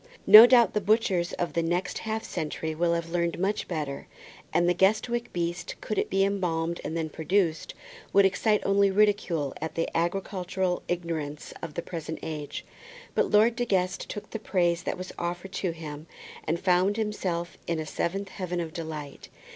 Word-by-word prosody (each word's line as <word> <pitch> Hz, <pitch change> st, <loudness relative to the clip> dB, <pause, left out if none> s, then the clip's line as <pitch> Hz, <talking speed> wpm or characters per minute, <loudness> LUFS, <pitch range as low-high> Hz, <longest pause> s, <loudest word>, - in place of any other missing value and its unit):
No 220 Hz, +3 st, +11 dB
doubt 240 Hz, -4 st, +5 dB
the 210 Hz, -, +1 dB
butchers 190 Hz, -4 st, +2 dB
of 175 Hz, -, -2 dB
the 170 Hz, -, +1 dB
next 175 Hz, +2 st, -1 dB
half 220 Hz, 0 st, -3 dB
century 160 Hz, +1 st, -3 dB
will 170 Hz, +2 st, +1 dB
have 170 Hz, 0 st, -4 dB
learned 170 Hz, -1 st, 0 dB
much 195 Hz, +4 st, -1 dB
better, 150 Hz, -5 st, -4 dB, 0.4 s
and 175 Hz, -, +2 dB
the 175 Hz, -, +4 dB
Guestwick 220 Hz, +6 st, +1 dB
beast, 175 Hz, 0 st, -3 dB
could 215 Hz, -, -2 dB
it -, -, -1 dB
be 195 Hz, +1 st, +2 dB
embalmed 170 Hz, -4 st, -1 dB
and 160 Hz, +2 st, -3 dB
then 160 Hz, -1 st, -1 dB
produced, 165 Hz, +2 st, -1 dB, 0.4 s
would 200 Hz, 0 st, +6 dB
excite 210 Hz, +2 st, +2 dB
only 200 Hz, 0 st, +4 dB
ridicule 195 Hz, -8 st, +1 dB
at 160 Hz, -, -4 dB
the 165 Hz, -, 0 dB
agricultural 180 Hz, +1 st, -1 dB
ignorance 160 Hz, -4 st, -4 dB
of 165 Hz, -3 st, -7 dB
the 170 Hz, -, -3 dB
present 160 Hz, -2 st, -5 dB
age; 150 Hz, -2 st, -5 dB, 0.5 s
but -, -, +1 dB
Lord 220 Hz, +3 st, +4 dB
De 245 Hz, -, -1 dB
Guest 185 Hz, -5 st, -1 dB
took 210 Hz, -, -7 dB
the 225 Hz, -, -4 dB
praise 175 Hz, -5 st, +1 dB
that 185 Hz, -, -3 dB
was 185 Hz, 0 st, -7 dB
offered 175 Hz, +2 st, -4 dB
to 190 Hz, -1 st, -2 dB
him, 155 Hz, -2 st, -7 dB, 0.4 s
and 165 Hz, +2 st, 0 dB
found 185 Hz, +3 st, +2 dB
himself 185 Hz, -6 st, -2 dB
in 170 Hz, -, 0 dB
a 155 Hz, -, -3 dB
seventh 195 Hz, +5 st, -3 dB
heaven 180 Hz, -3 st, -4 dB
of 165 Hz, -2 st, -4 dB
delight. 155 Hz, -4 st, -7 dB
175 Hz, 180 wpm, -27 LUFS, 165-195 Hz, 0.5 s, No